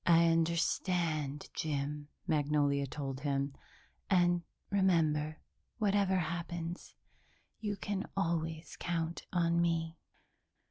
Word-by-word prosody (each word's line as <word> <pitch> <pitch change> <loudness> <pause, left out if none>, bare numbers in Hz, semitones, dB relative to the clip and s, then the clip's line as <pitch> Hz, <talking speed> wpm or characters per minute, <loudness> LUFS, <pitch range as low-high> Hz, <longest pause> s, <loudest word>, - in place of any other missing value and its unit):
"I 170 0 +7
understand, 165 -2 +1
Jim," 145 -1 -2 0.2
Magnolia 145 -2 +2
told 135 -1 -4
him, 140 0 0 0.6
"and, 175 -2 +4 0.3
remember, 155 -6 +2 0.4
whatever 200 -3 +3
happens, 170 0 -3 0.6
you 205 -2 -2
can 200 -1 -2
always 165 -3 -1
count 170 -1 -2
on 170 -1 +3
me." 165 -1 0
165 Hz, 90 wpm, -34 LUFS, 150-175 Hz, 0.6 s, I